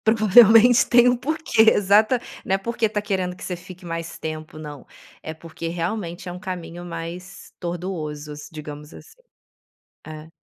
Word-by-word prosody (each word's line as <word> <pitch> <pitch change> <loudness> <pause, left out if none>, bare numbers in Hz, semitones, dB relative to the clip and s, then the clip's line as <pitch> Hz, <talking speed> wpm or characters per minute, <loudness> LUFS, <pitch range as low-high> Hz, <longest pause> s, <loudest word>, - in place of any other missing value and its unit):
Provavelmente 225 +3 +6
tem 245 0 +6
um 245 - +1
porquê. 295 -3 +1
Exata 215 +5 +3 0.2
não 190 - +1
é - - 0
porque 230 +2 -1
tá 210 -1 -3
querendo 185 -3 -2
que - - -12
você 180 - -4
fique 180 0 -13
mais 165 0 -5
tempo, 155 0 -7
não. 150 -2 -9 0.4
É 160 - -6
porque 165 +1 -8
realmente 175 +1 -4
é - - -5
um 180 - -8
caminho 175 -1 -7
mais 170 +3 -8
tortuoso 170 -4 -5
as 150 0 -9
digamos 150 -1 -9
assim. 450 +1 -15 0.9
É. 155 0 -9
180 Hz, 160 wpm, -22 LUFS, 165-210 Hz, 0.9 s, Provavelmente